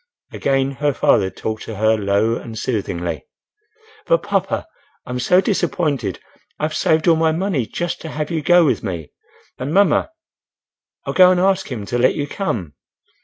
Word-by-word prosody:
Again 135 0 0
her 145 -2 +1
father 95 - +3
talked 110 +2 -5
to 110 - -6
her 110 +2 +3
low 105 +2 +1
and 115 -1 -7
soothingly. 85 - -3 0.8
"But - - +3
papa—I'm 280 - -4
so 180 +9 +4
disappointed—I've 155 - -3
saved 160 +1 +2
all 165 - +6
my 160 0 +2
money 160 - -1
just 175 0 -4
to 160 - -7
have 150 +1 -4
you 160 -2 -1
go 175 +2 +5
with - - +1
me. 85 -7 -5 0.5
And 130 +3 -3
mamma—I'll 310 - -2
go 185 -1 +7
and 185 -1 +3
ask 190 -3 +1
him 110 -5 -4
to 120 +4 -2
let 125 - +3
you 145 - -2
come." 115 - -3
145 Hz, 155 wpm, -20 LUFS, 110-175 Hz, 0.8 s, go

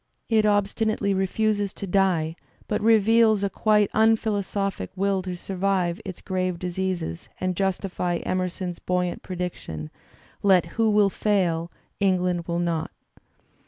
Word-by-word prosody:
It 220 -2 +4
obstinately 205 0 +1
refuses 205 +1 0
to - - -6
die 175 -4 +1 0.3
but 210 - -1
reveals 220 -1 +4
a 200 - 0
quite 210 -2 +2
unphilosophic 205 - +1
will 195 0 +1
to 185 -1 -5
survive 185 0 -1
its 190 -4 -7
grave 185 -2 -1
diseases 180 - -3
and 185 -1 -1
justify 185 -2 -1
Emerson's 185 -1 -2
buoy 180 0 0
ant - - -7
prediction: 175 - -5 0.5
"Let 190 -4 +4
who 220 +6 0
will 205 -2 +4
fail, 175 -6 0 0.3
England 180 -3 +1
will 170 -1 -1
not." 170 -2 -1
190 Hz, 125 wpm, -25 LUFS, 180-205 Hz, 0.5 s, It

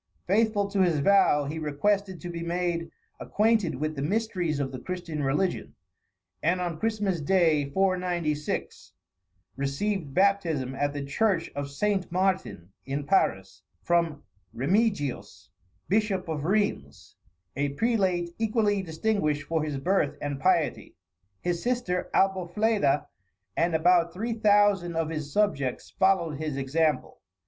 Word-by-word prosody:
Faithful 205 +1 +2
to 200 -1 0
his 175 -4 +3
vow, 150 -2 +4
he 155 +3 -4
requested 190 +5 0
to 175 - -6
be 170 -1 -5
made 170 0 -2 0.3
acquainted 215 - +1
with 155 +3 -3
the 135 - -4
mysteries 180 -3 -1
of 135 -2 -2
the 130 - -6
Christian 175 -1 -5
religion; 145 +7 -1 0.7
and 175 +3 +1
on 175 -3 -3
Christmas 205 -5 -1
day, 155 -3 +2
496, 175 -4 -1 0.6
received 140 +3 -2
baptism 170 -10 +2
at 145 +2 -1
the 145 -1 -4
church 170 +3 0
of 140 0 -3
St. 190 +5 -1
Martin, 185 - -1
in 140 +1 -4
Paris, 95 - +1 0.2
from 170 -4 +1 0.3
Remigius, 180 - -1 0.4
Bishop 195 -2 0
of 155 -2 -3
Rheims, 205 +3 -1 0.4
a 145 +1 0
prelate 190 -5 +1
equally 215 -2 +1
distinguished 160 -3 -1
for 160 +2 -1
his 150 -2 -3
birth 150 -2 0
and 145 -1 -4
piety. 170 -6 +1 0.5
His 175 -1 -1
sister 240 -8 -1
Albofleda, 190 -4 +1 0.5
and 165 0 +1
about 170 +1 +3
three 230 +5 -2
thousand 205 -5 +3
of 165 -1 0
his 155 -3 -5
subjects, 140 -10 0
followed 190 -6 +1
his 155 -3 -3
example. 150 +3 0
175 Hz, 130 wpm, -27 LUFS, 150-195 Hz, 0.7 s, vow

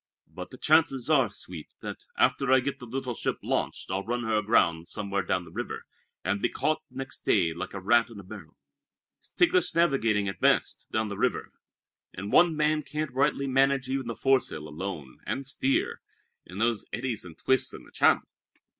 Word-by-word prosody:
But - - -9
the - - -11
chances 155 -3 +3
are, 135 -7 +4
Sweet, 90 -5 -10
that - - -7
after 135 -2 +3
I 130 - +7
get 135 +2 -3
the 125 - -9
little 130 +1 -3
ship - - -2
launched - - -2
I'll 95 +1 -1
run 120 +2 -2
her 110 -1 0
aground 90 -6 +2
somewhere 100 -2 -2
down 90 -1 -1
the 80 - -13
river, - - -5 0.4
and 100 - 0
be - - +2
caught 155 0 0
next 135 0 -6
day 85 -6 +3
like 85 - -6
a - - -3
rat 115 +5 +3
in 115 -3 -10
a - - -9
barrel. 95 - -11 0.6
It's - - -16
ticklish 355 +1 +2
navigating 115 -11 +2
at 95 -3 -4
best, - - +2
down 110 -1 0
the 100 - -6
river, - - 0 0.6
and 100 +2 -5
one 170 -2 +5
man 155 0 +2
can't 150 0 -4
rightly 140 +1 +1
manage 135 0 +2
even 135 -2 -2
the 115 - -3
foresail 130 - +1
alone, 75 -3 -6
and 135 - -2
steer, 135 0 0 0.5
in 90 - -9
those 115 0 +1
eddies 120 -3 -3
and 85 -3 -11
twists 130 0 +2
in - - -9
the - - -17
channel. - - +4
120 Hz, 190 wpm, -28 LUFS, 100-135 Hz, 0.6 s, I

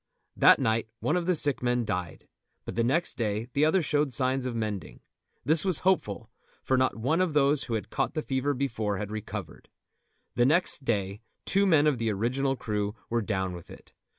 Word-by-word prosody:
That - - +6
night 110 0 0
one 155 - 0
of 175 -1 -1
the 180 - +3
sick 145 -3 +2
men 120 -1 0
died, 90 -4 -4 0.4
but - - -5
the 115 - 0
next 155 +9 0
day 110 +1 -2
the 140 - +2
other 160 +3 +3
showed 145 -1 0
signs 130 0 0
of 120 - -4
mending. 105 -4 -4 0.4
This 155 +2 +5
was 185 -5 +1
hopeful, 115 - 0 0.3
for 130 - +1
not 130 0 +1
one 155 +10 +1
of 180 -4 0
those 145 0 +2
who 115 - -2
had 110 - -5
caught - - -1
the 155 - -2
fever 135 +2 -1
before 115 -6 -2
had 105 +1 -5
recovered. 105 -5 -7 0.6
The 120 - +2
next 155 -2 +1
day 100 -2 -1 0.2
two 200 +1 +2
men 155 -5 +4
of 145 -5 +2
the 115 -1 0
original 130 +6 0
crew 105 -3 -3 0.2
were 120 0 +1
down 95 -3 -2
with 85 -1 -10
it. - - -14
125 Hz, 200 wpm, -28 LUFS, 110-145 Hz, 0.6 s, That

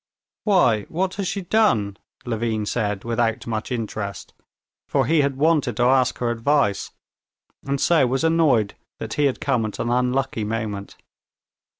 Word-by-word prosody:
"Why, 125 - +3
what 185 +3 -1
has 200 -2 -2
she 200 - -2
done?" 165 - +2 0.3
Levin 115 -2 -1
said 105 -3 -2
without 115 -1 -1
much 110 +1 -4
interest, 110 -4 -4 0.6
for - - +2
he 160 -1 +3
had 140 -1 0
wanted 145 -6 +2
to 120 - +2
ask 130 0 +3
her 120 -1 -1
advice, 120 -2 +1 0.7
and 140 0 -2
so 160 -5 +3
was 135 +4 -1
annoyed 155 -11 +3 0.2
that - - -5
he 145 - +1
had 135 - 0
come 130 -5 0
at 105 - -7
an 120 - -2
unlucky 125 -1 0
moment. 105 -2 -4
125 Hz, 155 wpm, -22 LUFS, 110-145 Hz, 0.7 s, Why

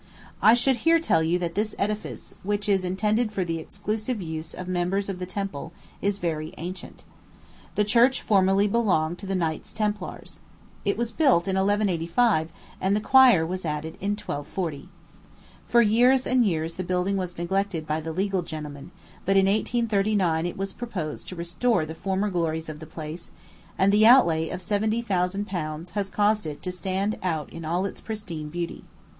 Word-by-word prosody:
I 220 - +7
should 250 +1 +2
here 330 +7 +4
tell 320 - +2
you 165 +2 +2
that 170 -2 -3
this 210 +3 -1
edifice, 210 +1 -3
which 205 +1 -2
is 195 -2 +2
intended 210 +5 0
for 195 - -1
the 165 -1 -2
exclusive 210 +7 -3
use 160 -2 -5
of 185 - -7
members 185 +2 0
of 185 -2 -4
the 180 - -4
Temple, 185 -4 -4 0.3
is 200 0 0
very 160 -4 -3
ancient. 180 +3 -7 0.7
The 210 - +3
church 235 +5 +4
formerly 195 -1 +4
belonged 180 -7 +1
to 200 - -8
the 195 - -1
Knights 160 -4 -2
Templars. 210 -1 -4 0.5
It 200 0 +1
was 235 0 -1
built 250 - +3
in 190 - 0
1185, 190 -2 +2 0.3
and 190 +2 +2
the - - +2
choir 245 -7 +6
was 185 +2 -4
added 155 0 -3
in 200 +2 0
1240. 155 -4 -4 0.8
For 235 0 +5
years 245 +4 +4
and 255 -1 +3
years 165 -2 -1
the 185 - -4
building 180 +2 0
was 180 -2 -3
neglected 180 -1 -1
by 155 +1 -1
the 160 +1 -4
legal 190 +2 0
gentlemen; 150 -2 -7 0.3
but 195 +1 +2
in 195 - +5
1839 200 -5 +1
it 175 - -6
was 195 0 -3
proposed 185 -11 -5
to 185 - -6
restore 175 +3 0
the 160 - -6
former 195 +4 -1
glories 160 -2 -1
of 150 -1 -7
the 160 - -9
place, 160 +1 -7 0.5
and 195 +1 +4
the 215 +1 +6
outlay 170 -11 +5
of 185 - -5
seventy 215 +4 0
thousand 195 -1 0
pounds 170 -3 -5
has 200 +1 -2
caused 210 -1 +1
it 150 -1 -7
to 180 - -2
stand 190 +3 -2
out 160 -5 -2
in 165 - -7
all 175 +4 0
its 195 - -6
pristine 180 -9 -5
beauty. 170 +1 -5
190 Hz, 180 wpm, -26 LUFS, 165-210 Hz, 0.8 s, I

